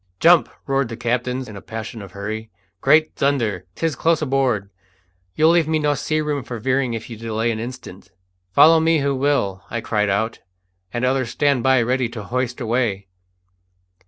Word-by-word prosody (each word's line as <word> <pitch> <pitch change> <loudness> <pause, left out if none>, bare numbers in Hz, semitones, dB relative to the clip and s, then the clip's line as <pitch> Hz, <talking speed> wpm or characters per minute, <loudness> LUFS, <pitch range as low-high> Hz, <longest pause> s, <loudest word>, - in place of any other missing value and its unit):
"Jump!" 170 0 +5 0.2
roared 135 -2 0
the 115 - -6
captain, 125 +2 -1
in 105 - -10
a 100 - -8
passion 110 0 -7
of 95 -2 -11
hurry. 110 +2 -5 0.3
"Great 155 0 +4
thunder! 115 -10 0
'tis 165 -3 -1
close 165 +4 +2
aboard! 130 -9 0 0.6
You'll 160 +1 +5
leave 170 -2 +3
me 160 0 +1
no 150 -1 +1
sea 155 +2 -1
room 150 -3 -2
for 120 +1 -6
veering 130 +1 0
if 110 - -6
you 115 - -8
delay 115 +1 -2
an 110 - -3
instant." 115 -6 -8 0.4
"Follow 160 - +7
me 165 0 +3
who 140 0 +1
will!" 130 -9 0
I 115 - -2
cried 105 -2 0
out; 110 +3 -1 0.5
"and 120 +4 -1
others 130 -1 0
stand 140 +1 +1
by 130 -1 +4
ready 125 0 0
to 115 -3 -7
hoist 125 +3 -2
away." 115 -5 -1
125 Hz, 180 wpm, -21 LUFS, 110-140 Hz, 0.6 s, Follow